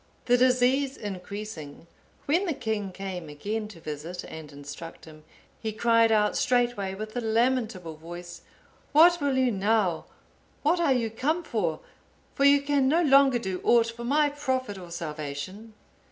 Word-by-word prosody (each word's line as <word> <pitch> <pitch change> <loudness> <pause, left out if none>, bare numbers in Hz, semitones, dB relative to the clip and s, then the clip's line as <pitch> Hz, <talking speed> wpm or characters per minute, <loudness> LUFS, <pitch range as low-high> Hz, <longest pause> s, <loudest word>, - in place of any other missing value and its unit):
The 245 - +4
disease 255 +2 +3
increasing, 195 -6 -7 0.4
when 345 +7 +1
the 325 - -1
king 215 -5 -3
came 185 -4 -6
again 210 +9 -4
to 200 -6 -13
visit 155 +3 -6
and 155 -2 -9
instruct 145 +3 -9
him, 155 -1 -14 0.4
he 220 - -2
cried 230 +1 +3
out 210 -1 +3
straightway 240 -6 +1
with 215 +3 -7
a 245 - -1
lamentable 225 -7 0
voice, 175 +2 -9 0.5
"What 340 +2 +6
will 280 -2 +1
you 260 -2 +3
now? 200 -4 +1 0.6
What 325 +4 +3
are 335 -5 +2
you 235 -4 +1
come 305 +10 -1
for? 180 - -2 0.5
for 275 - +1
you 280 0 +6
can 280 -2 +2
no 330 +5 +3
longer 275 -3 +5
do 190 -6 -4
aught 230 -1 +4
for 235 - -7
my 290 +4 +3
profit 260 -8 -2
or 175 -2 -10
salvation." 165 +6 -6
220 Hz, 155 wpm, -27 LUFS, 180-260 Hz, 0.6 s, What